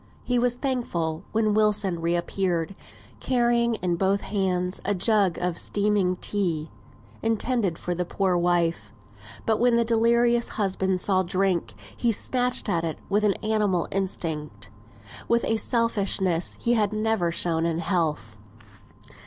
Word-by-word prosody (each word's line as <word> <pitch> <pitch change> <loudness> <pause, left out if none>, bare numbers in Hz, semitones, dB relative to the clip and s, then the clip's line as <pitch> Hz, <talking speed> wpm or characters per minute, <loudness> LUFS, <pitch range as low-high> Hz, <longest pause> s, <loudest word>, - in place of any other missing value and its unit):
He 250 -1 +1
was 245 0 +1
thankful 180 - -2
when 215 -1 +1
Wilson 210 -4 +1
re 170 +1 +1
appeared, 175 0 -1 0.5
carrying 240 -2 +1
in 175 -4 -1
both 195 +2 +1
hands 185 -2 -1
a 205 - 0
jug 200 -2 +2
of 175 -1 -2
steaming 205 -3 +1
tea, 170 -6 -2 0.5
intended 225 -5 0
for 180 - -3
the 180 +1 -1
poor 185 +1 0
wife; 170 -10 0 0.5
but 220 -1 +1
when 245 0 +3
the 235 0 +2
delirious 235 +1 +3
husband 190 -2 +1
saw 190 -2 +2
drink, 185 - -1 0.2
he 235 - +1
snatched 250 +3 0
at 165 -1 0
it 160 -2 -3
with 205 +2 +1 0.2
animal 210 -5 +1
instinct, 150 - -3 0.6
with 235 0 +2
a 225 - +1
selfishness 200 -6 0
he 235 - +1
had 215 -3 +2
never 215 -5 0
shown 165 -1 0
in 165 -1 -1
health. 160 - -2
195 Hz, 135 wpm, -25 LUFS, 175-225 Hz, 0.6 s, when